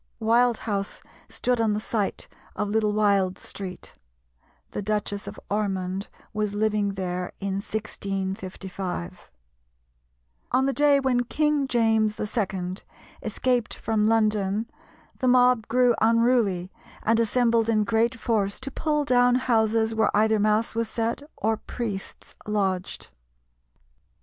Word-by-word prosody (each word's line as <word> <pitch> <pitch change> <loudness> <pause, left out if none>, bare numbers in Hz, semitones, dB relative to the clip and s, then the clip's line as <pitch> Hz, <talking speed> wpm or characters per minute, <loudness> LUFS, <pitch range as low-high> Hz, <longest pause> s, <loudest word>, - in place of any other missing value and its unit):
Wild 235 +1 +3
House 200 -3 -3 0.3
stood 250 -2 0
on 220 -2 +2
the 210 - -1
site 215 -2 -2 0.3
of 210 - -1
Little 215 0 +2
Wild 200 -3 +2
Street. 190 -2 -7 0.8
The - - -3
Duchess 205 0 -2
of - - -7
Ormond 195 -2 -2 0.2
was 210 -1 -1
living 210 -1 +1
there 180 -1 -3
in 195 -1 -2
1655. 190 - -5 1.2
On 265 - +3
the 275 - +1
day 290 0 +4
when 255 -2 +1
King 300 +2 +1
James 220 -3 +2
II. 190 -4 -2 0.4
escaped 240 +2 0
from 215 -1 0
London 215 -1 +1 0.5
the 255 - 0
mob 250 -3 +4
grew 250 0 +4
unruly, 225 -5 +2 0.3
and 225 +1 +3
assembled 230 0 +2
in 215 -2 +3
great 230 +2 +1
force 210 -4 0
to 275 +1 -4
pull 300 +1 0
down 245 -1 +4
houses 225 -3 +2
where 220 -1 +2
either 220 0 +3
mass 215 +2 +2
was 230 -1 -1
said 230 +3 -2 0.2
or 220 +1 0
priests 215 -3 -6
lodged. 195 -3 -2
220 Hz, 125 wpm, -25 LUFS, 200-235 Hz, 1.2 s, day